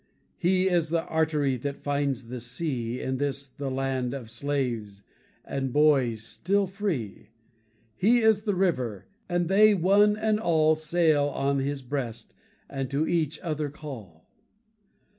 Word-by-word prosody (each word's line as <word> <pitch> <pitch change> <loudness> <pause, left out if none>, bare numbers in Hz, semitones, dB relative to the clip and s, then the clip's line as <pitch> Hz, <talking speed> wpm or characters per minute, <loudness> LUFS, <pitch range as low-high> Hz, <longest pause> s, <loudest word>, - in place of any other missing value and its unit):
He 185 +1 +2
is 170 -4 +2
the 165 0 0
artery 150 -4 0
that 140 +3 -5
finds 140 -4 -1
the 125 0 -5
sea 125 -1 -3
In 130 0 -2
this 140 0 -2
the 135 +1 -6
land 130 -1 -2
of 120 -5 -8
slaves, 120 -6 -3 0.4
and 135 -1 -3
boys 135 -6 +3
still 195 - 0
free. 170 - -4 0.7
He 225 - +4
is 220 -2 +4
the 210 -3 -1
river, 130 - -1 0.2
and 175 -1 0
they 210 +3 +5
one 200 +4 +4
and 215 0 +1
all 160 -6 +3
Sail 155 -1 +2
on 140 0 0
his 135 0 -3
breast, 120 -4 -5 0.3
and 135 -2 -4
to 145 +3 0
each 155 -3 0
other 155 -4 -2
call. 115 - -10
145 Hz, 140 wpm, -27 LUFS, 130-170 Hz, 0.7 s, they